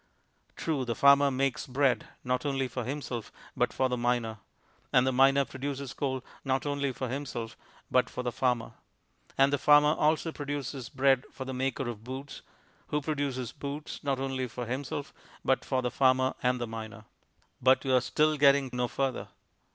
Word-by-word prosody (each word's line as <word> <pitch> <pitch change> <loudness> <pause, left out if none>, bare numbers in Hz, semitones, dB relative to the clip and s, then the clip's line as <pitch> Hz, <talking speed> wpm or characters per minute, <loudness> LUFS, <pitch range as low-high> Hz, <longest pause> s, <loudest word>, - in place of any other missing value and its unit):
True, 150 -5 -1
the 120 -2 -2
farmer 140 0 +6
makes 135 -1 -1
bread, 130 -1 +1 0.2
not 125 0 0
only 135 -2 0
for 125 0 -4
himself, 125 -3 -4 0.2
but - - +1
for 130 - +1
the 125 -1 -1
miner; 120 -2 0 0.5
and 125 - +5
the 130 - +2
miner 135 +2 +5
produces 140 0 -5
coal 130 -2 -2 0.2
not 135 0 0
only 140 -1 0
for 130 +1 -4
himself, 120 -3 -4 0.4
but 125 - +3
for 125 - -5
the 120 - -1
farmer; 125 -2 0 0.7
and 135 +1 +4
the 145 - +2
farmer 150 0 +6
also 160 +1 +1
produces 140 -4 -5
bread 135 -1 +3
for 130 - -7
the 130 - -4
maker 135 0 -1
of 110 -3 -6
boots, 130 +3 -7 0.5
who 150 - 0
produces 140 -5 -2
boots, 145 +1 -6
not 140 -2 0
only 135 -1 -2
for 120 +1 -6
himself, 140 +4 -4 0.3
but 135 - +2
for 130 -2 -1
the 125 - -1
farmer 130 0 +3
and 125 0 +1
the 120 - -1
miner. 110 -1 -8 0.6
But 130 +2 +4
you 130 - +2
are 125 - +5
still 155 +4 +2
getting 140 -2 +4
no 125 0 0
further. 135 +2 -2
130 Hz, 175 wpm, -29 LUFS, 125-140 Hz, 0.7 s, farmer